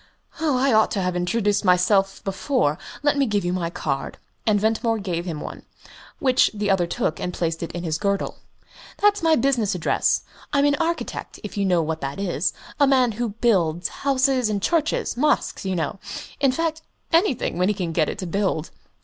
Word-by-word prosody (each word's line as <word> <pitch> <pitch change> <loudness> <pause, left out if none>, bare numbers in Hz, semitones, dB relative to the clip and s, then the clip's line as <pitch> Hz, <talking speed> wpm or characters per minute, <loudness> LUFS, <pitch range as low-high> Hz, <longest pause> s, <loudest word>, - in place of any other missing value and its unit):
"I 275 -5 +2
ought 220 0 +5
to 195 - 0
have 180 0 -1
introduced 200 +4 +1
myself 195 +1 +3
before 195 - 0 0.2
let 290 -1 +2
me 275 - +3
give 205 -4 0
you 175 - 0
my 175 -2 -1
card;" 140 -5 -3 0.3
and 210 -1 +4
Ventimore 225 +2 +1
gave 180 -4 -3
him 165 -4 -4
one, - - -7 0.6
which 260 -1 +3
the 205 -1 0
other 180 -3 +2
took 160 - -1
and 180 - -2
placed 165 -2 -2
in 170 +1 -5
his 160 -2 -1
girdle. 200 -1 -1 0.6
"That's 415 0 +3
my 325 -1 +4
business 235 -7 +1
address. 170 - +1 0.3
I'm 280 0 +4
an 290 - +4
architect, 335 +1 -3
if 210 - -7
you 200 -1 0
know 175 -3 +3
what 160 0 -3
that 140 +5 -4
is 180 -4 0 0.3
a 285 - +5
man 260 -3 +4
who 235 +2 -2
builds 175 -7 +2
houses 265 -3 +2
and 205 -1 0
churches 315 - 0
mosques, 295 -6 +1
you 190 -1 -1
know 170 +4 -2 0.4
in 275 -2 +4
fact, 320 +2 -1 0.3
anything, 325 - +2
when 180 - +3
he 210 - +1
can 180 -4 -2
get 160 -2 +1
it - - -5
to 185 - -4
build." 180 -3 -1
200 Hz, 190 wpm, -23 LUFS, 175-260 Hz, 0.6 s, ought